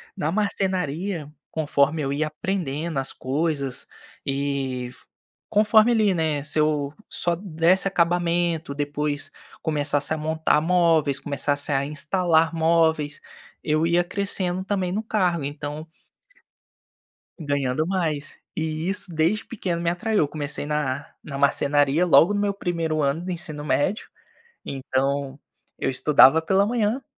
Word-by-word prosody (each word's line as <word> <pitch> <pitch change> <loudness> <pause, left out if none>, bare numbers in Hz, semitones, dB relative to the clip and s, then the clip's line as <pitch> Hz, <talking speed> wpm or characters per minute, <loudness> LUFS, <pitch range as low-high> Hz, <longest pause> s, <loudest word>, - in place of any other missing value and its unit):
Na 155 +2 -1
marcenaria, 185 -5 -1 0.2
conforme 155 0 +1
eu 135 -1 -2
ia 150 +2 0
aprendendo 160 -2 -3
as 135 - -2
coisas 140 -1 -2 0.4
e 135 -2 -2
f 125 - -16 0.4
conforme, 215 +2 +5
ali, 215 -4 +3
né, 160 -4 0
se 150 +1 -1
eu 150 -2 +1 0.2
só 175 - +1
desse 180 +1 +2
acabamento, 170 -3 0
depois 145 0 -2 0.3
começasse 145 -1 0
a 155 - -2
montar 160 0 +1
móveis, 165 -4 +2
começasse 145 0 0
a 135 0 +1
instalar 160 +2 +1
móveis, 160 -2 +1 0.4
eu 155 +1 +1
ia 175 +1 +3
crescendo 190 -1 -2
também 190 -3 -1
no 205 +4 -1
cargo, 180 -9 0
então 145 +2 -6 1.5
Ganhando 145 0 -1
mais. 165 -6 -2 0.2
E 160 +1 -2
isso 190 -3 0
desde 170 +8 +1
pequeno 180 -7 -3
me 170 - -1
atraiu, 205 +5 0
eu 150 - +2
comecei 145 -1 -3
na 145 -2 -2 0.2
na 140 -2 -7
marcenaria, 145 +2 +3
logo 180 +2 +5
no 205 - 0
meu 205 -1 +1
1º 165 -5 -2
ano 145 +4 0
do 185 - -4
ensino 155 -4 -3
médio, 155 +8 0 0.6
então 135 +1 -2 0.4
eu - - -1
estudava 145 +3 +5
pela 195 +4 +2
manhã 235 +3 0
160 Hz, 130 wpm, -24 LUFS, 145-180 Hz, 1.5 s, conforme